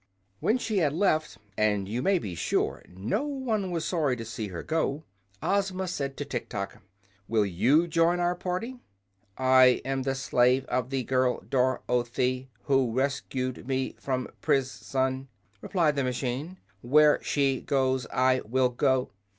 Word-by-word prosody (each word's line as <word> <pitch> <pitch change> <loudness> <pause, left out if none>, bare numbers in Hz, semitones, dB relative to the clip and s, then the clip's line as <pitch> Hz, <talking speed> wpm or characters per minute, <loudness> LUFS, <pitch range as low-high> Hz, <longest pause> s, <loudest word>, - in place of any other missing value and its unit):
When 225 - +2
she 220 -5 -1
had 150 -5 +2
left 155 -3 +1
them 105 - -26 0.2
(and 105 -2 +1
you 115 +5 -2
may 195 +6 +3
be 100 - -5
sure 85 - -1
no 95 - -2
one 255 -9 -2
was 170 -2 -2
sorry 150 -7 +1
to 115 -2 -7
see 110 -1 -5
her 90 -3 -6
go) 160 -2 -1 0.4
Ozma 190 -1 0
said 140 -5 -3
to 145 - -3
Tiktok: 110 -7 -5 0.5
"Will 110 -2 +2
you 120 - +3
join 165 +1 +2
our 175 0 +2
party?" 185 +8 -4 0.6
"I 130 -1 +5
am 135 0 -1
the 135 0 -1
slave 130 -1 +2
of 125 0 -1
the 135 -1 -1
girl 130 0 +1
Dor 130 0 +1
oth 120 -1 -1
y, 130 +1 0 0.2
who 135 -4 +2
rescued 130 -1 -2
me 130 -1 -1
from 130 -2 -2
pris 135 0 -1
on," 130 0 0 0.3
replied 165 -6 +1
the 140 - 0
machine. 130 +7 -3 0.2
"Where 150 +4 +5
she 135 -2 +1
goes 130 -2 0
I 130 0 +2
will 125 +3 +1
go." 130 +1 +1
130 Hz, 160 wpm, -28 LUFS, 125-160 Hz, 0.6 s, I